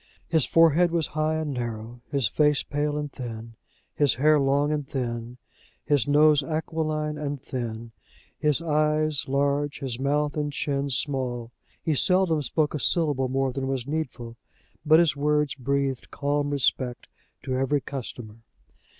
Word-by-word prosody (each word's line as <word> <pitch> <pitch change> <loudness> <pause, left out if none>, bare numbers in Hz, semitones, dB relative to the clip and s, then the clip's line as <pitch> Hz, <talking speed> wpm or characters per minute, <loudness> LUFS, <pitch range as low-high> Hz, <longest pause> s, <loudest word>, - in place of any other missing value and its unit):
His 160 -4 +3
forehead 165 +1 +5
was 165 -2 0
high 155 +1 0
and 155 -2 -2
narrow, 120 -1 -5
his 140 -4 +1
face 150 +5 +2
pale 145 0 -2
and 145 -1 -4
thin, 115 -3 -7 0.4
his 145 -3 +3
hair 150 +4 +4
long 140 +2 +2
and 150 -2 -2
thin, 120 -2 -4 0.5
his 145 -1 +2
nose 150 0 +5
aquiline 155 0 -2
and 145 -1 -3
thin, 115 -3 -5 0.5
his 150 +1 +2
eyes 155 -1 +1
large, 140 +1 0
his 130 -4 -5
mouth 145 +2 0
and 150 -1 -1
chin 140 +1 -2
small. 125 -3 -2 0.3
He 160 - +1
seldom 180 +1 +3
spoke 150 +2 0
a 150 - -2
syllable 145 -4 +2
more 135 0 0
than 135 0 -3
was 135 -3 -2
needful, 130 -6 -4 0.5
but 155 +1 +6
his 165 -4 +3
words 150 0 +1
breathed 135 0 -2
calm 145 0 -1
respect 130 -3 0 0.4
to 130 -1 -2
every 135 +2 +1
customer. 120 -5 -7
145 Hz, 150 wpm, -26 LUFS, 130-150 Hz, 0.5 s, but